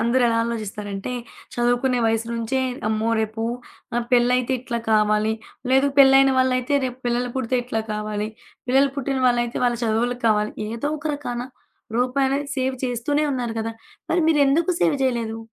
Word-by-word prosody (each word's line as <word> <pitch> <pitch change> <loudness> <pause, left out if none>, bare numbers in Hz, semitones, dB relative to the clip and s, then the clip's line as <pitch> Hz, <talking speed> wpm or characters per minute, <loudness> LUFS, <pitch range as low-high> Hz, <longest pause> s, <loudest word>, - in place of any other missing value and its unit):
అందరూ 235 +3 +2
ఎలా 230 - +1
ఆలోజిస్తారంటే 210 -1 -4 0.4
చదువుకునే 245 +1 +1
వయసు 225 0 0
నుంచే, 235 +3 -1 0.3
"అమ్మో! 220 +1 0
రేపు 220 +1 -3 0.5
నా 240 - +2
పెళ్లయితే 250 +1 +3
ఇట్లా 240 -2 -3
కావాలి, 215 0 +3 0.4
లేదు 270 +1 +4
పెళ్లయిన 270 0 +7
వాళ్ళయితే 255 +1 +2
రేపు 250 0 -4
పిల్లలు 240 +1 0
పుడితే 255 0 0
ఇట్లా 225 -3 -2
కావాలి, 210 0 -3 0.4
పిల్లలు 275 +2 +4
పుట్టిన 270 -1 -1
వాళ్ళయితే 240 -1 +1
వాళ్ళ 240 -1 +2
చదువులకి 235 +2 0
కావాలి," 210 0 +1 0.2
ఏదో 235 +6 -2
ఒక 305 - -6
రకాన 245 -4 -4 0.6
రూపాయి 255 +2 +2
అనేది 280 +1 -1
సేవ్ 260 0 0
చేస్తూనే 255 +5 0
ఉన్నారు 240 -3 -3
గదా! 225 +1 -3 0.4
మరి 350 - +3
మీరెందుకు 300 +3 +3
సేవ్ 310 - +3
జేయలేదు? 235 -4 -1
245 Hz, 150 wpm, -23 LUFS, 225-265 Hz, 0.6 s, పెళ్లయిన